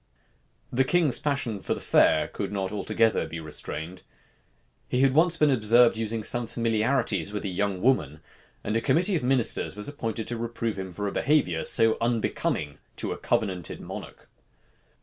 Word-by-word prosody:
The 130 +2 +3
king's 155 -2 +2
passion 140 -8 -2
for - - -2
the - - -7
fair - - +3
could - - -5
not 95 -2 -2
altogether 110 +2 +1
be 85 - -6
restrained. 80 +3 -5 0.9
He 125 - 0
had 135 -1 +4
once 165 +3 +3
been 150 -2 +4
observed 120 0 +5
using 110 0 -2
some 120 +2 +1
familiarities 115 -5 0
with 105 0 -4
a - - -1
young 95 0 -2
woman; 115 - +1 0.4
and 105 - -2
a 115 - +1
committee 180 - +2
of 160 - 0
ministers 125 -6 +1
was 105 0 -4
appointed 115 -6 -4
to 120 - -3
reprove 115 -2 -3
him 95 0 -5
for 105 +4 -4
a - - -2
behavior 130 - +1
so 115 0 +3
unbecoming 110 -10 -1 0.2
a - - -2
covenanted 90 -6 -2
monarch. - - -9
115 Hz, 165 wpm, -26 LUFS, 100-130 Hz, 0.9 s, observed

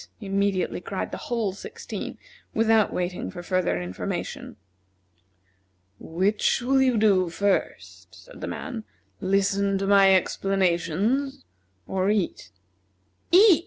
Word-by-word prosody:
immediately 195 -3 -1
cried 195 - -4
the - - -4
whole 225 -5 0
sixteen, 195 - -7 0.4
without 225 -1 +3
waiting 180 0 -3
for 175 - -8
further 180 - 0
information. 90 +1 -5 1.4
"Which 190 +6 +1
will 265 +2 +2
you 255 -3 +3
do 195 -4 +3
first," 200 +3 -2
said - - -14
the - - -4
man, 240 -5 -5 0.4
"listen 195 0 +1
to 195 - -2
my 195 -1 +6
explanations, 195 - 0 0.4
or 190 +1 0
eat?" 200 - -1 0.8
"Eat!" 375 0 +7
195 Hz, 110 wpm, -25 LUFS, 185-225 Hz, 1.4 s, Eat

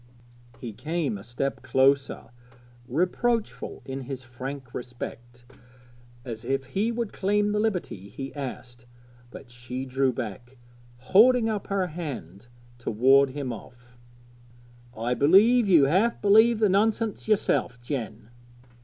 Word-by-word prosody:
He 115 -3 -7
came 155 0 -2
a 100 - -8
step 120 +4 -3
nearer, 135 0 +2 0.6
reproachful 195 - -1
in 135 0 -5
his 130 0 -7
frank 130 +1 -8
respect, 120 0 -8 0.8
as 115 -3 -6
if 135 +2 -1
he 195 - -1
would 235 -2 -3
claim 205 +1 +1
the 210 - 0
liberty 180 - -2
he 135 +4 -7
asked; 125 -3 -8 0.4
but 120 0 -12
she 125 +2 -6
drew 135 0 +1
back, 120 +1 -7 0.4
holding 225 - +5
up 210 -2 -3
her 195 -2 0
hand 150 - -7 0.3
to 120 - -4
ward 135 +5 +5
him 130 -2 -4
off. 120 +2 -14 1.0
'I 120 +2 -1
believe 200 - +5
you 170 -7 +6
half 190 +12 +2
believe 220 +3 +5
the 215 -1 +3
nonsense 215 +3 0
yourself, 195 - +1
Jen.' 120 -4 -5
135 Hz, 125 wpm, -26 LUFS, 120-200 Hz, 1.0 s, you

